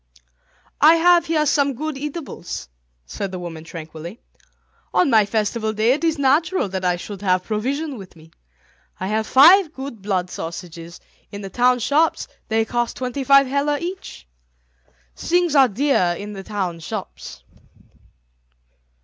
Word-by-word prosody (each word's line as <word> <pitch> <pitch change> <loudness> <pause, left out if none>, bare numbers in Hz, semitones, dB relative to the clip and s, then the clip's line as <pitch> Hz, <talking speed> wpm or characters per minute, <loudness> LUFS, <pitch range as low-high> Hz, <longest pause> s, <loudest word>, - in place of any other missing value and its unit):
"I 310 +3 +7
have 345 0 +4
here 310 -2 +1
some 280 -2 +1
good 310 +3 -4
eatables," 280 - -6 0.4
said 195 - -5
the 185 - -5
woman 170 -3 -7
tranquilly; 165 +5 -9 0.8
"on 295 - +3
my 215 -2 +4
festival 220 +1 -1
day 220 +3 +2
it 300 - -4
is 325 -1 +1
natural 290 - +2
that 190 0 -4
I 180 -1 +2
should 195 +2 -8
have 185 -2 +1
provision 265 +6 -3
with 190 -2 -12
me. 160 0 -18 0.7
I 185 - -3
have 220 +1 -1
five 330 +5 +6
good 265 -5 -7
blood 185 -3 -2
sausages; 170 0 -8 0.3
in 200 - -7
the 195 -1 -8
town 250 +3 +3
shops 295 +7 +1 0.2
they 225 0 +1
cost 240 +1 -2
twenty 255 +2 -3
five 275 +1 +6
heller 280 +2 0
each. 360 - -7 0.9
Things 350 -2 0
are 270 -2 +7
dear 215 -7 +1
in 210 +1 -7
the 195 - -7
town 190 -4 -4
shops." 160 - -8
235 Hz, 150 wpm, -21 LUFS, 190-290 Hz, 0.9 s, I